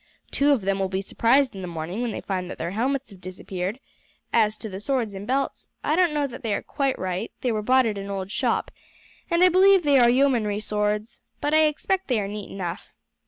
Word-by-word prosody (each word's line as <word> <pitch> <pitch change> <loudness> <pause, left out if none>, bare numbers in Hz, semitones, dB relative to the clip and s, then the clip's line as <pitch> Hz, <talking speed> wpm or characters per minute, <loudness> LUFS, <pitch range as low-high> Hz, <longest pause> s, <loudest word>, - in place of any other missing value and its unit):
Two 285 +1 +3
of 270 -6 +3
them 195 0 0
will 190 -1 0
be 190 0 -1
surprised 255 +7 +2
in 190 - -6
the 180 - -5
morning 170 +5 -4
when 245 - -1
they - - -5
find 185 -2 -3
that - - -7
their 170 +2 -3
helmets 260 +5 -1
have 190 -2 -14
disappeared; 185 +3 -5 0.5
as 215 -2 +3
to 220 - -7
the 190 -2 -6
swords 235 -2 -1
and 195 +2 -7
belts, 270 +2 -2
I 305 - +1
don't 355 -1 +3
know 295 -1 0
that 255 -2 -7
they 220 -4 -1
are - - -4
quite 275 -3 -1
right; 185 +3 -3
they 250 - 0
were 215 -1 -1
bought 255 +4 +4
at 210 -3 -2
an 200 0 -6
old 195 -1 -4
shop, - - 0 0.6
and 340 +1 +3
I 365 - +8
believe 380 +1 +5
they 285 -2 +5
are 240 -1 +6
yeomanry 240 -5 +2
swords, 210 +1 -2 0.2
but 295 - -1
I 310 0 +6
expect 380 +5 -1
they 245 -4 +1
are 200 - -2
neat 205 0 -6
enough. 180 0 -5
220 Hz, 235 wpm, -24 LUFS, 195-275 Hz, 0.6 s, I